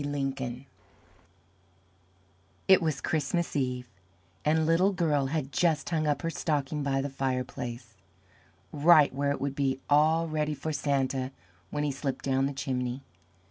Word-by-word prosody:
LINCOLN 135 -3 -3 2.0
It 190 -1 +7
was 155 -4 -1
Christmas 165 +2 -1
Eve, 125 -3 -1 0.6
and 160 +1 +2
Little 175 +5 +3
Girl 150 -6 +1
had 145 -1 -2
just 155 +1 +1
hung 155 -2 +1
up 150 +3 0
her 165 - -1
stocking 150 -2 -1
by 135 -1 0
the 140 - -2
fireplace 125 -3 -4 0.8
right 150 -1 +5
where 140 +1 0
it 140 - -1
would 140 0 -2
be 135 -1 0
all 160 +3 +4
ready 155 -1 -1
for 155 +2 -4
Santa 135 -2 0 0.4
when 150 0 -2
he 145 - 0
slipped 135 0 -4
down 135 0 +2
the - - -3
chimney. 130 -1 -3
140 Hz, 140 wpm, -29 LUFS, 135-155 Hz, 2.0 s, It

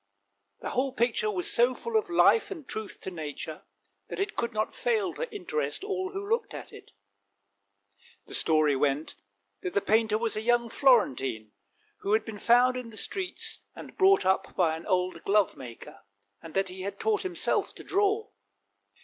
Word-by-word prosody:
The - - -4
whole 260 +1 0
picture 235 -3 +1
was 185 -4 -1
so 245 +2 +4
full 465 - -5
of 430 -3 +2
life 385 +5 +4
and 330 -9 -8
truth 215 -3 -5
to 190 - -5
nature 155 -1 -6 0.4
that - - -6
it 405 +1 -2
could 235 - -1
not 215 -1 -1
fail 435 -7 0
to - - -5
interest 415 +1 -3
all 380 -2 -2
who 395 +1 -5
looked 460 +2 -1
at - - -9
it. - - -13 1.4
The - - -10
story 155 -3 +3
went 140 +2 0 0.5
that 180 - -5
the - - +5
painter 220 +1 +2
was 225 0 0
a 215 - -1
young 240 +1 +2
Florentine, 135 - +2 0.5
who 200 - -1
had 220 0 +2
been 220 -2 -7
found 245 +3 +4
in 250 -2 -6
the 220 - -9
streets 375 - -3 0.2
and - - -10
brought 390 +1 +5
up 190 0 +1
by 165 -4 +2
an 160 - -9
old 185 -2 0
glovemaker; 180 - -1 0.4
and 165 - -11
that 195 -1 +1
he 185 +1 -7
had 200 +1 -5
taught 435 -1 +1
himself 365 -3 0
to - - -8
draw. 410 +2 +1
230 Hz, 175 wpm, -28 LUFS, -, 1.4 s, the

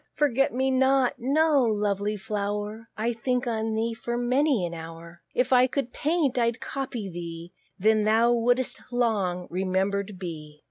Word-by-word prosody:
"Forget 275 -2 +2
me 265 +2 0
not:" 265 0 +3
no, 285 +2 +3
lovely 210 -2 0
flow'r, 210 +2 -4
I'll 230 +3 0
think 250 +2 -1
on 220 -2 -1
thee 230 +1 0
for 235 +1 -4
many 250 - +2
an 170 - -5
hour: 165 +1 -9
If 255 +1 +2
I 255 0 +6
could 260 -2 -3
paint, 295 -5 +1
I'd 235 0 +1
copy 255 -7 -4
thee; 170 -1 -7 0.2
Then 215 +2 +3
thou 225 +3 +4
wouldst 245 +2 +1
long 205 -7 0
remember'd 190 +2 -1
be. 155 -5 -8
225 Hz, 150 wpm, -26 LUFS, 195-250 Hz, 0.2 s, I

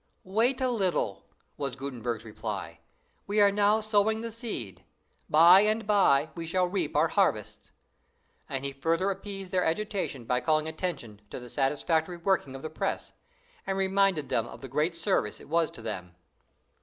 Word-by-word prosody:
"Wait 230 +8 +1
a 260 -1 +1
little," 180 - -1 0.3
was 135 -4 -3
Gutenberg's 120 -4 -4
reply; 110 - -6 0.5
"we 205 +1 +1
are 200 -1 +6
now 205 +1 +3
sowing 215 +1 +2
the 230 0 -5
seed; 215 - -4 0.5
by 170 +4 +8
and 215 +1 +1
by 160 -8 +3
we 165 -1 -6
shall 180 +2 +2
reap 180 -4 -2
our - - +3
harvests." - - 0 0.8
And 135 0 -3
he 140 - -3
further 165 +8 0
appeased 195 -1 -7
their 185 -1 +2
agitation 185 - -2
by 125 +2 0
calling 155 -1 +1
attention 155 - -5
to - - -6
the 125 -1 -11
satisfactory 160 +5 0
working 170 -6 0
of 135 - -9
the 155 - -4
press, - - -3 0.5
and 195 0 -1
reminded 195 -5 +2
them 115 0 0
of - - -11
the 135 - -7
great 150 +6 0
service 165 - 0
it - - -14
was 165 0 +2
to 115 - -12
them. 90 -6 -6
170 Hz, 170 wpm, -28 LUFS, 135-200 Hz, 0.8 s, by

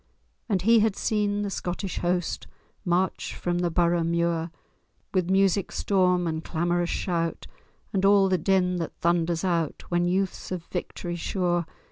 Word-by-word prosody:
And 190 -4 +1
he 230 +2 +6
had 215 -2 +2
seen 205 -2 0
the 200 - -3
Scottish 180 +1 -3
host 175 0 -1 0.4
March 180 +1 0
from 175 0 -1
the 175 -1 +1
Borough 170 0 +2
muir, 170 0 0 0.6
With 185 -2 +1
music 195 0 +2
storm 180 -3 +2
and 160 -1 -2
clamorous 175 +1 0
shout, 170 -3 -2 0.5
And 195 -1 +1
all 195 0 +6
the 185 -1 +1
din 180 +1 +2
that 165 -2 -4
thunders 170 0 +1
out 170 -5 -1
When 175 0 +1
youth's 190 +1 -1
of 180 -2 -3
victory 175 0 -5
sure. 175 -1 0
175 Hz, 150 wpm, -26 LUFS, 170-190 Hz, 0.6 s, he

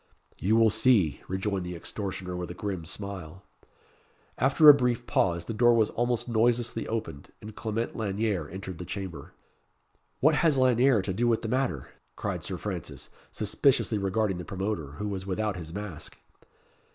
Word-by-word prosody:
"You 105 +4 +2
will 115 -1 +5
see," 110 - +3
rejoined 95 0 -2
the 90 0 -5
extortioner 95 0 -4
with 90 0 -4
a 90 - -7
grim 95 -5 -4
smile. 95 -1 -6 1.0
After 140 +4 +5
a 150 - +13
brief 125 -3 0
pause, 85 -6 +1
the 115 - -4
door 120 +2 +4
was 110 -2 +2
almost 120 0 -1
noiselessly 120 0 +1
opened, 105 -11 -5
and 110 0 -10
Clement 115 +1 -3
Lanyere 100 -6 -1
entered 95 -1 -7
the 90 - -6
chamber. 95 -1 -6 0.9
"What 155 +4 +4
has 150 -1 +3
Lanyere 130 -3 +4
to 95 - -2
do 120 +5 +1
with 115 -2 +1
the 110 - -3
matter?" 125 - -1 0.3
cried - - -4
Sir - - -4
Francis, - - -6 0.2
suspiciously 110 +1 +1
regarding 100 -1 0
the - - -5
promoter, 95 -6 -4
who 105 +7 -4
was 95 -2 -4
without 105 +1 -1
his 80 -3 -7
mask. 100 -4 -7
105 Hz, 165 wpm, -28 LUFS, 90-115 Hz, 1.0 s, a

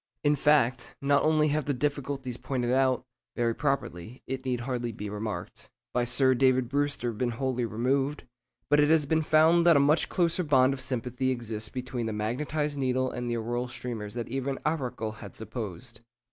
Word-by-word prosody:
In 145 0 +4
fact, 140 -4 +2
not 140 0 +3
only 155 -1 +3
have 150 -1 0
the 145 - 0
difficulties 140 -2 -2
pointed 125 -1 -2
out 130 -1 +2 0.3
(very 115 -1 +1
properly, 125 - -3
it 130 0 -5
need 125 -2 -1
hardly 120 -1 -2
be 105 -1 -6
remarked) 105 +1 -5 0.2
by 120 0 +1
Sir 130 +2 +3
David 130 -1 +3
Brewster 140 -4 0
been 120 +3 -1
wholly 125 0 -1
removed; 135 +6 0 0.4
but 145 +2 +4
it 150 0 +4
has 160 -2 +4
been 160 +2 +2
found 160 +2 +4
that 170 -3 +7
a - - +5
much 145 +3 +3
closer 175 0 +1
bond 135 -3 +4
of 135 - -5
sympathy 130 0 -2
exists 110 -4 -2
between 125 -2 -4
the 110 - -2
magnetised 145 +7 -2
needle 130 -1 0
and 125 0 -4
the 120 - -1
auroral 120 +2 -2
streamers 115 -4 -6
than 120 -1 -3
even 135 0 -2
Arago 130 -8 -1
had 105 -2 -10
supposed. 110 +1 -6
130 Hz, 180 wpm, -28 LUFS, 120-145 Hz, 0.4 s, that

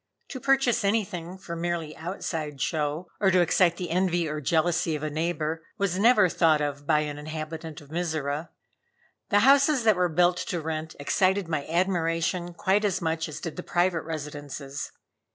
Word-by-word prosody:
To 260 - -6
purchase 270 -3 +2
anything 185 -4 -1
for 170 -2 -7
merely 165 -2 -3
outside 160 -3 -4
show, 155 +3 -1
or 195 - +4
to 185 -1 +4
excite 175 0 +3
the 180 -3 -4
envy 175 -1 +1
or 150 0 -3
jealousy 160 +2 +1
of 150 - -5
a 155 - -2
neighbor, 160 0 -2
was 195 -3 0
never 215 -3 +6
thought 165 -3 +3
of 145 -1 -3
by 150 -1 +4
an 145 -1 -4
inhabitant 155 +1 -6
of 145 0 -16
Mizora. 160 -2 -2 0.8
The 205 -1 +4
houses 275 +1 +5
that 220 -2 +5
were 180 -1 +1
built 175 +2 +3
to 175 - -3
rent 160 0 -4
excited 185 +6 +1
my 155 -4 -2
admiration 170 0 0
quite 200 +3 +2
as 200 -4 +1
much 160 -1 -1
as 155 0 -6
did 165 0 -6
the - - -3
private 175 -1 +1
residences. 145 -3 -6
165 Hz, 170 wpm, -27 LUFS, 155-185 Hz, 0.8 s, never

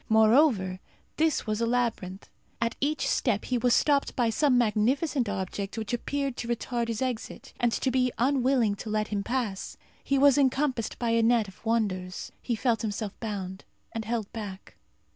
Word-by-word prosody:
Moreover, 220 -4 +4 0.4
this 315 -1 +1
was 215 0 -1
a 230 - +2
labyrinth. 230 -6 -1 0.3
At 230 0 -1
each 285 0 0
step 215 -5 +1
he 250 -1 0
was 245 0 +3
stopped 285 -2 +2
by 235 -3 +2
some 275 +1 +3
magnificent 245 +3 +1
object 195 +1 -4
which 220 0 -4
appeared 275 +2 -2
to 235 - -4
retard 235 0 -2
his 230 +2 -2
exit, 250 -3 -5
and 240 -1 +2
to 260 - 0
be 250 -1 +2
unwilling 255 -3 +2
to 215 - -7
let 215 0 -1
him 205 -1 -1
pass. 225 -3 -3 0.3
He 275 - +1
was 285 +1 +5
encompassed 265 -3 +1
by 235 -1 0
a 230 0 +3
net 225 -1 +3
of 195 - -15
wonders. 200 -5 -1
He 240 - -1
felt 230 0 +1
himself 210 -2 -3
bound 195 -4 -5 0.3
and 225 - -4
held 225 -2 -3
back. 200 -4 -7
230 Hz, 175 wpm, -28 LUFS, 210-255 Hz, 0.4 s, was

